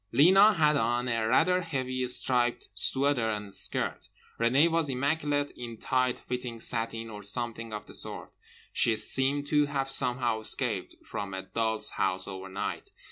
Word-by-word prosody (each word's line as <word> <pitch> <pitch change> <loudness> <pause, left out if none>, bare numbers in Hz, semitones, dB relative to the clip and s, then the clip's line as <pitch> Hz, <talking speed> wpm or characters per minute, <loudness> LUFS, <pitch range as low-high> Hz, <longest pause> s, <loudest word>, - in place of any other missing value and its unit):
Lena 195 +8 +6
had 150 -5 +3
on 120 0 0
a 115 -2 0
rather 180 +9 +3
heavy 130 -6 -3
striped 125 -1 +1
sweater 135 -4 +1
and 105 -2 -4
skirt. - - -1 0.3
Renée 130 +7 +4
was 165 -3 0
immaculate 145 +2 0
in 120 -2 -8
tight 130 +1 0
fitting 125 -2 -5
satin 115 0 -3
or 105 -1 -8
something 115 +2 -3
of 105 -1 -6
the - - -13
sort; - - -5 0.4
she 115 - +3
seemed 135 +5 +1
to 150 0 +2
have 135 -1 -2
somehow 120 -3 +2
escaped 110 - 0
from 100 -2 -5
a 95 - -5
doll's 110 +3 -1
house 95 0 +2
overnight. 95 0 -5
125 Hz, 150 wpm, -28 LUFS, 110-145 Hz, 0.4 s, Lena